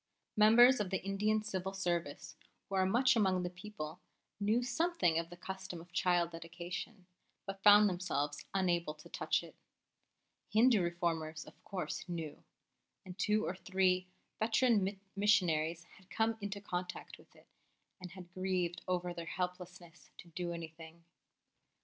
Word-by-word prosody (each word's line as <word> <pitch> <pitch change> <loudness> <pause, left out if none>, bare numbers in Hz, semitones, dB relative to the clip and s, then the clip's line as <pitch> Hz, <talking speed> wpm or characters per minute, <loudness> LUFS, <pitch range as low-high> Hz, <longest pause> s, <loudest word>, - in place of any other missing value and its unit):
Members 235 +4 +7
of 205 -3 -1
the 190 -1 0
Indian 210 +2 +1
Civil 190 -3 -3
Service, 175 -6 -2 0.3
who - - -11
are 190 -1 +3
much 250 +6 +4
among 190 -4 +2
the 180 - -3
people, 180 -3 -8 0.4
knew 215 +4 +2
something 250 - +1
of 165 0 -5
the 175 - -11
custom 190 -1 -6
of 170 +1 -14
child 175 -1 +2
dedication, 175 +4 -7 0.4
but 195 0 -6
found 205 +1 +8
themselves 165 -6 -2
unable 175 -5 0
to 150 - -15
touch - - 0
it. - - -13 0.9
Hindu 225 -1 +5
Reformers, 165 -2 -2
of - - -16
course, 180 -1 -5
knew; 165 -4 -5 0.6
and 180 -1 -8
two 215 +1 +2
or - - -2
three 185 -1 +1 0.3
veteran 220 -3 +2 0.2
missionaries 170 -5 +2
had 185 +2 -21
come 225 +2 +1
into 205 0 -4
contact 180 -3 -5
with - - -21
it - - -20 0.6
and 180 -1 -8
had 185 -2 -12
grieved 185 -2 -1
over 180 -1 -1
their 170 -1 -7
helplessness 180 -1 -6
to 175 - -12
do 175 +1 -4
anything. 165 0 -9
185 Hz, 145 wpm, -34 LUFS, 170-205 Hz, 0.9 s, found